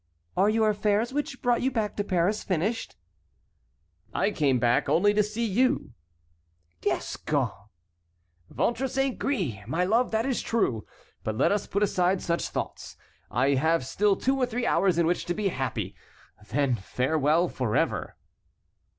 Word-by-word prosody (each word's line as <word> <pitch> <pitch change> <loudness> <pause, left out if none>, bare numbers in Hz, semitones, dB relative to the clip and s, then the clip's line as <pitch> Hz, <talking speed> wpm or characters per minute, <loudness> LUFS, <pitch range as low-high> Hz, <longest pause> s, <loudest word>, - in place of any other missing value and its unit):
"Are 195 +3 +4
your 220 0 +3
affairs 210 +4 0
which 285 -3 -3
brought 245 -1 +2
you 260 - +2
back 225 -5 -2
to 205 - 0
Paris 190 +2 0
finished?" 195 +5 -2 1.2
"I 210 - +2
came 140 -8 +2
back 120 +3 +2
only 205 +4 +4
to 210 - +4
see 215 +3 -2
you." 250 - +1 0.9
"Gascon!" - - -1 1.0
"Ventre 240 +3 0
saint 270 0 -1
gris! 185 - -1
My 165 +8 0
love, 230 +7 +2
that 220 +1 0
is 265 -3 0
true; 130 - -1 0.4
but 110 0 -3
let - - +3
us 205 0 0
put 200 +1 0
aside 185 -1 +2
such 170 -1 -1
thoughts. - - -5 0.3
I 125 +5 +1
have 145 +1 +2
still 200 +8 +2
two 265 +6 +1
or 255 -2 +1
three 245 0 -2
hours 190 -7 +2
in 170 - +3
which 175 +2 0
to 175 - -2
be 210 -2 0
happy; 120 - -3 0.5
then 140 0 +1
farewell 150 - +1
forever." 125 -9 -1
195 Hz, 150 wpm, -27 LUFS, 145-225 Hz, 1.2 s, Are